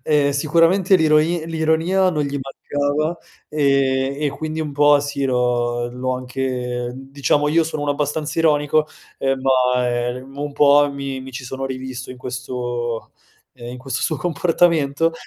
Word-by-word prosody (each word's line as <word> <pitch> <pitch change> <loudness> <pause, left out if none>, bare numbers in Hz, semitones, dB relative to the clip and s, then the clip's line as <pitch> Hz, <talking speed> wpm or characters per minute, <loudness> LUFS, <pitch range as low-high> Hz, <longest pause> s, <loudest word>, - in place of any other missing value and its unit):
Ehm, 145 -2 +3
sicuramente 170 +6 +3
l'ironi 160 +1 +2
l'ironia 165 +4 +1
non 150 -3 -1
gli 140 0 -3
mancava, 145 +4 -2 0.3
ehm, 135 -2 +1
e 145 - +2
quindi 155 +3 -4
un 150 -2 -3
po' 145 0 +5
sì 140 -1 -3
l'ho 120 -1 0
l'ho 130 +1 -2
anche 130 +1 -4 0.4
ehm, - - -8 0.2
diciamo, 145 +1 +1
io 165 +2 +3
sono 155 -2 -4
uno 145 - 0
abbastanza 150 +2 -2
ironico, 155 -1 +3 0.3
ehm, 135 -1 0
ma, 125 -1 +2 0.2
ehm, 130 +2 -7
un 145 0 -4
po' 145 0 +5
mi 135 -1 -5
mi 130 0 -9
ci 130 0 -7
sono 135 +1 -4
rivisto 130 -1 -6
in 130 - -9
questo, 125 -2 -4 0.4
ehm, 120 -1 -9
in 125 - -8
questo 130 0 -4
suo 155 - 0
comportamento 165 -1 +1
140 Hz, 155 wpm, -20 LUFS, 130-155 Hz, 0.4 s, po